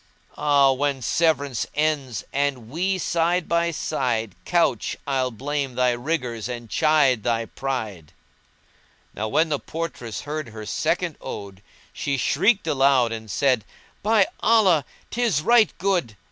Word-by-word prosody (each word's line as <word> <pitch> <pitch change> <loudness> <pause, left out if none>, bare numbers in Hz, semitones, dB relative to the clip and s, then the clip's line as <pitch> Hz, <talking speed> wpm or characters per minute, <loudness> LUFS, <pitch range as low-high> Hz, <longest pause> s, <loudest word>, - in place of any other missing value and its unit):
Ah, 145 -2 +4
when 135 -1 -1
severance 145 -4 +1
ends 150 -5 0
and 140 -5 -1
we 185 +7 0
side 170 0 0
by 170 0 +1
side 125 - -2
* - - -37
Couch, 165 - +1
I'll 130 -2 0
blame 135 +2 -3
thy 125 0 +3
rigours 120 -3 -3
and 120 -2 -7
chide 150 -6 +3
thy 115 0 0
pride!" 110 - -5 1.0
Now 110 - -3
when 160 +9 +2
the 145 -2 0
portress 155 -9 -5
heard 150 -2 -5
her 110 -1 -8
second - - -1
ode 100 -1 -7 0.3
she 140 -1 -2
shrieked 210 - +2
aloud 135 -4 +3
and 110 -1 -6
said, 125 +1 +2 0.4
"By 210 -1 +4
Allah! 190 - +4 0.3
'tis 225 - +1
right 235 +1 +5
good!" 180 - 0
140 Hz, 135 wpm, -23 LUFS, 120-165 Hz, 1.0 s, right